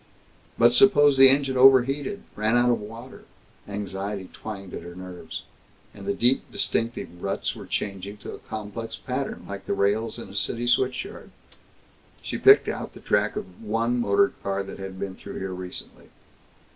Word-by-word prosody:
But 120 +1 +6
suppose 145 -3 +6
the 135 0 +9
engine 135 -1 +2
overheated, 135 +9 +4
ran 110 +3 +2
out 120 0 +4
of 120 - 0
water? 115 +5 -10 0.4
Anxiety 100 -1 -5
twanged 100 -4 -8
at - - -5
her 85 +1 -10
nerves. 90 -3 -8 0.5
And 100 -1 -10
the 100 - +1
deep 125 +3 +1
distinctive 115 -6 -2
ruts 100 0 -2
were - - -9
changing 100 0 -4
to - - -5
a - - -9
complex 110 +1 -6
pattern, 130 +5 -4
like 100 -1 -7
the - - 0
rails 105 +3 +1
in 120 - -8
a 100 - -11
city 115 +4 -1
switchyard. 125 +1 0 0.9
She - - -4
picked - - +7
out - - -4
the - - -10
track 105 +1 +1
of - - -3
the 95 +4 -15
one 115 +3 +1
motor 120 +4 +3
car 100 0 -1
that 95 - -9
had 95 -1 -7
been 100 -1 -4
through - - -9
here 95 -1 -4
recently. 90 0 -7
110 Hz, 170 wpm, -25 LUFS, 100-125 Hz, 0.9 s, the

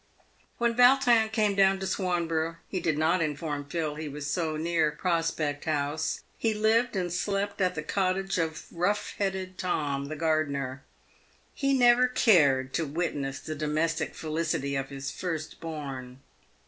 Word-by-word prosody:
When 235 0 +2
Yautrin 245 -2 +5
came 215 -2 +2
down 195 -1 +4
to 190 - -3
Swanborough, 165 -4 -1
he 185 - -3
did 155 -4 0
not 165 +3 +2
inform 150 -1 -2
Phil 160 -2 -2
he 155 0 -5
was 145 0 -6
so 155 +1 -1
near 165 -1 +1
Prospect 160 -2 -1
House. 150 0 -1 0.2
He 225 -2 +1
lived 220 +2 +2
and 180 -2 -1
slept 200 +2 -1
at 185 -1 +2
the 150 - -3
cot 185 +2 +1
tage 195 -1 -2
of 160 -2 -2
rough 200 +5 0
headed 190 -2 -2
Tom, 145 -6 -1
the 155 +2 -5
gardener. 145 -4 -1 0.7
He 275 -1 +1
never 245 0 +6
cared 140 - +4
to 160 +1 0
witness 140 -3 -2
the 155 - -5
domestic 155 +2 -1
felicity 155 -3 -2
of 135 0 -2
his 135 0 -5
first 160 -4 -4
born. 135 -6 -6
165 Hz, 155 wpm, -28 LUFS, 150-195 Hz, 0.7 s, never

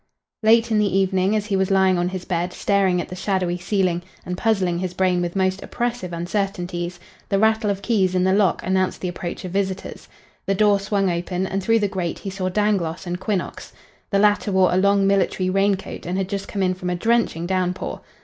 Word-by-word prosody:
Late 230 +1 +4
in 215 - +3
the 200 -2 +2
evening, 190 +1 +2
as 210 -1 0
he 205 -2 -1
was 190 0 +1
lying 190 -2 +3
on 175 +1 0
his 185 -1 -6
bed, 180 0 -2
staring 195 -3 +2
at - - -4
the 180 - -6
shadowy 185 -2 -1
ceiling 180 -2 0 0.2
and 180 - -3
puzzling 185 -4 +1
his 180 -1 -4
brain 180 -1 +2
with 175 +1 -3
most 190 0 +1
oppressive 240 -6 -3
uncertainties, 175 -1 -3 0.3
the 195 - +2
rattle 220 +1 +2
of 200 -1 -2
keys 190 -6 +1
in 180 - +2
the 190 0 +3
lock 200 -2 +2
announced 185 0 0
the 185 - -2
approach 175 0 -5
of 180 - -5
visitors. 190 0 -3 0.4
The 195 - +2
door 205 0 +4
swung 200 0 0
open 180 +2 -2
and 195 +1 -2
through 225 +4 +3
the 205 - +2
grate 185 -4 -3
he 195 - -6
saw 185 -1 -2
Dangloss 190 -4 0
and 175 0 -3
Quinnox. 185 -1 -3 0.4
The 200 - +1
latter 205 0 +3
wore 190 -1 +3
a - - +2
long 200 +1 +3
military 195 -1 +1
rain 195 +1 +3
coat 190 - -8
and 180 +2 -1
had 190 -1 -2
just 200 -1 -3
come 195 -2 -2
in 185 0 +2
from 180 0 -5
a 180 - 0
drenching 225 -4 +1
downpour. 185 0 -2
190 Hz, 215 wpm, -22 LUFS, 180-200 Hz, 0.4 s, Late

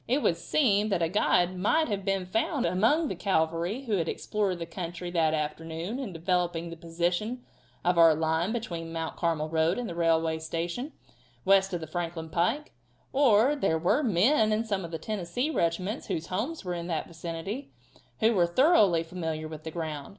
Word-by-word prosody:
It 270 +4 +1
would 170 - +3
seem 215 -8 +2
that 185 -4 +1
a 165 - +1
guide 180 -1 +2
might 215 - +2
have 200 -3 -2
been 195 -1 0
found 235 - 0
among 235 - +2
the - - -2
cavalry 170 +5 0
who 220 -6 0
had 165 -2 -1
explored 200 -4 -1
the 170 - -5
country 175 +1 -6
that 160 -2 +2
afternoon 160 - -4
in 255 -8 -4
developing 170 -1 -1
the - - -6
position 175 +9 -2 0.4
of 180 -1 +3
our 165 -2 +7
line 160 +4 0
between 175 -8 -4
the 165 - -8
Mount 165 -1 -3
Carmel 165 -3 0
road 160 +2 +1
and 245 -1 -3
the - - -5
railway 165 -1 +1
station, 170 - -4 0.5
west 195 0 +4
of 175 -2 -3
the - - -4
Franklin 165 0 -4
pike; 180 - 0 0.4
or 265 0 +4
there 195 - +1
were 185 - +2
men 220 - +3
in 215 +2 +1
some 200 -4 -2
of 170 - -6
the 165 - -4
Tennessee 215 - -2
regiments 185 - -1
whose 165 -5 -2
homes 220 - -3
were 180 - -2
in 170 0 -4
that 165 -3 -2
vicinity, 170 - -6 0.5
who 225 +1 +4
were 175 -4 +3
thoroughly 200 - +4
familiar 160 -2 -4
with 155 0 -9
the - - -3
ground. 155 -4 -5
175 Hz, 190 wpm, -28 LUFS, 165-215 Hz, 0.5 s, our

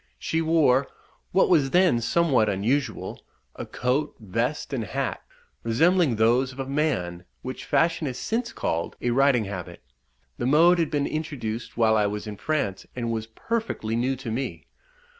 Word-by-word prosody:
She 160 - -1
wore, 150 -5 +3 0.4
what 190 - +4
was 150 -6 +4
then 175 -7 +4
somewhat 125 -4 +2
unusual, 120 +8 -1 0.3
a - - -6
coat, 135 +4 -1
vest, 115 +8 -2
and 125 -4 -1
hat, 100 - -3 0.4
resembling 160 +4 +3
those 120 +4 +3
of 130 - -14
a 135 - -2
man, 130 - -1 0.2
which 130 - -6
fashion 165 -2 +1
has 125 -2 -4
since 235 - -2
called 85 +1 -2
a 120 - 0
riding 130 -3 +3
habit. 95 -3 -7 0.6
The 120 - 0
mode 170 +5 +5
had 165 - +1
been 145 -1 0
introduced 130 -9 -4
while 110 -2 +4
I 105 -1 +3
was 105 +1 -4
in 105 -1 -6
France, 140 -11 -2
and 120 -2 -2
was 110 -1 -3
perfectly 115 - -3
new 125 +3 +1
to 125 -3 -6
me. 130 +4 -4
130 Hz, 160 wpm, -25 LUFS, 110-155 Hz, 0.6 s, mode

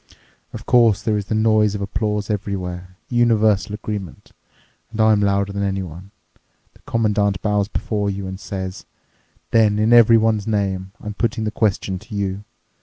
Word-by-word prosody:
Of - - -9
course, 115 -4 +4
there 110 -2 +1
is 100 -1 -3
the 110 - -1
noise 110 -1 +3
of 100 - -4
applause 105 +1 -2
everywhere, 90 -3 -4
universal 110 -4 +2
agreement. 105 -5 -7 0.6
And 115 0 -9
I'm 110 -1 +4
louder 100 0 +1
than 100 - -3
anyone. 95 -2 -4 0.6
The - - -23
Commandant 105 -3 +1
bows 105 -2 +1
before 105 -1 -2
you 100 0 -4
and 95 0 -6
says, 95 -1 -6 0.6
'Then 110 -2 +4
in 110 +2 +3
everyone's 115 -2 +5
name, 95 -3 -1
I'm 105 - -6
putting 115 +1 -1
the 105 - -1
question 100 -3 -1
to 110 - -10
you. 100 0 -2
105 Hz, 155 wpm, -20 LUFS, 100-110 Hz, 0.6 s, everyone's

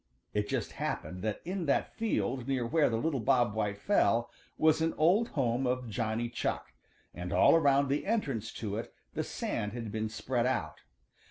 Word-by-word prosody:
It 105 0 -1
just - - -1
happened 90 0 -4
that 110 +1 -2
in 180 -2 -3
that 140 - +1
field 135 - -1
near 130 -3 0
where 150 +5 +3
the 115 - 0
little 145 +2 0
Bob 120 -3 +3
White 105 -2 -1
fell 120 - +2 0.3
was 160 0 +4
an 165 0 +1
old 185 +9 +4
home 125 0 +1
of 125 -2 -1
Johnny 115 +1 -1
Chuck, 120 0 -3 0.4
and 90 0 -6
all - - +6
around 140 -3 +4
the 140 +6 -1
entrance 140 - -1
to 105 -2 -4
it 115 - -6 0.2
the - - -1
sand 105 0 -3
had 115 -3 -5
been 110 +1 -2
spread 120 +2 -1
out. 90 -12 -2
120 Hz, 180 wpm, -31 LUFS, 110-145 Hz, 0.4 s, all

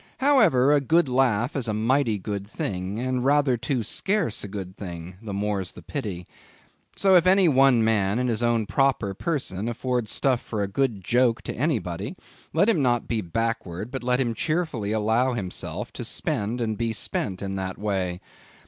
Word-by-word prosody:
However, 215 - +4
a 145 - +4
good 160 +4 +3
laugh 125 -3 +1
is 130 -4 0
a 105 - -1
mighty 115 0 +2
good 100 0 -5
thing, 95 -1 -4
and 125 +1 -1
rather 140 -1 +3
too 120 +1 -2
scarce 190 - 0
a - - -5
good 95 -2 -7
thing; 90 -2 -8
the 110 -3 -7
more's 100 -2 -2
the 90 - -12
pity. 95 - -5 0.7
So, 195 -1 +4
if 180 0 +5
any 190 0 +5
one 135 -5 +5
man, 105 -2 +2
in 125 0 0
his 115 -1 0
own 120 -2 +2
proper 125 -4 +1
person, 115 - -2
afford 125 -1 -2
stuff 130 -3 +1
for 105 -3 -3
a - - -1
good 110 -1 -1
joke 120 +2 +2
to - - -4
anybody, 120 - -2 0.4
let 170 +6 +3
him 205 -10 +3
not 120 -3 +1
be 115 -2 -1
backward, 115 +1 -3
but 135 - -4
let 125 +1 +1
him 120 -3 0
cheerfully 155 -7 -1
allow 110 +4 +1
himself 100 -6 -4
to - - -6
spend 115 +4 -2
and 110 -2 -2
be 115 -1 0
spent 100 -2 -2
in 95 0 -3
that 95 -1 -4
way. 95 -4 -2
115 Hz, 185 wpm, -25 LUFS, 100-135 Hz, 0.7 s, if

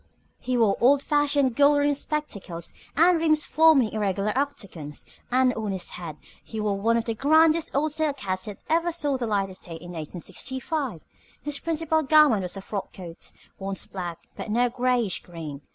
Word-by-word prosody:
He 255 0 -1
wore 220 -4 +3
old 275 +3 +5
fashioned 290 -4 +2
gold 290 +2 +5
rimmed 285 0 +2
spectacles, 200 - -3 0.2
the 315 - +5
rims 315 -2 +2
forming 310 -7 +5
irregular 205 0 -1
octagons, 200 - -4 0.2
and 255 0 +3
on 215 -2 -3
his 190 - -4
head 165 -4 -7 0.3
he 220 - -6
wore 205 -2 -1
one 230 +2 +3
of 230 - -1
the 230 - -1
grandest 315 +6 +4
old 300 +2 +1
silk 300 -2 0
hats 185 0 -2
that 210 -2 -6
ever 335 +2 +2
saw 295 -4 0
the 245 -3 -2
light 200 -3 0
of 185 - -14
day 170 - -8
in 175 +2 -10
1865. 235 - -4 0.4
His 295 -1 -1
principal 320 -1 0
garment 300 -7 +5
was 180 +1 -4
a - - -6
frock 200 0 -5
coat, 170 -3 -9 0.3
once 195 0 -3
black, 175 -3 -5 0.2
but - - -6
now 240 +3 +2
grayish 245 -4 0
green. 160 -5 -8
240 Hz, 180 wpm, -25 LUFS, 195-290 Hz, 0.4 s, old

